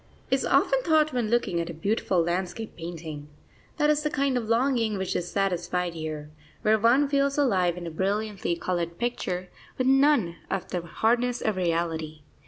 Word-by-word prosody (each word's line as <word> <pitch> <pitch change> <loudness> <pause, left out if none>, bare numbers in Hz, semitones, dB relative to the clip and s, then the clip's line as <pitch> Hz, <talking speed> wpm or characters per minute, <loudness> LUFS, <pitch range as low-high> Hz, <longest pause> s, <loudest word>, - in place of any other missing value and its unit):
is - - +2
often - - +3
thought 310 - +3
when 240 -4 0
looking 220 -7 +1
at 170 - -5
a 170 - -6
beautiful 185 0 +1
landscape 180 +5 -3
painting. 160 -3 -7 0.5
That 300 -1 +4
is 300 0 +1
the 300 - 0
kind 275 -2 0
of 230 -3 -2
longing 230 -3 +2
which 190 -1 -2
is 175 - -2
satisfied 180 -2 -1
here, 155 -2 -6 0.3
where 215 +1 +4
one 245 +6 +4
feels 280 0 +1
alive 185 -11 +2
in 175 - -6
a 165 - -5
brilliantly 200 +1 -1
coloured 170 -1 -2
picture, 185 -7 -2 0.3
with 255 - 0
none 270 - +4
of 185 - -3
the 180 - -2
hardness 235 +8 0
of 215 - 0
reality. 165 -3 -2
195 Hz, 175 wpm, -26 LUFS, 170-245 Hz, 0.5 s, That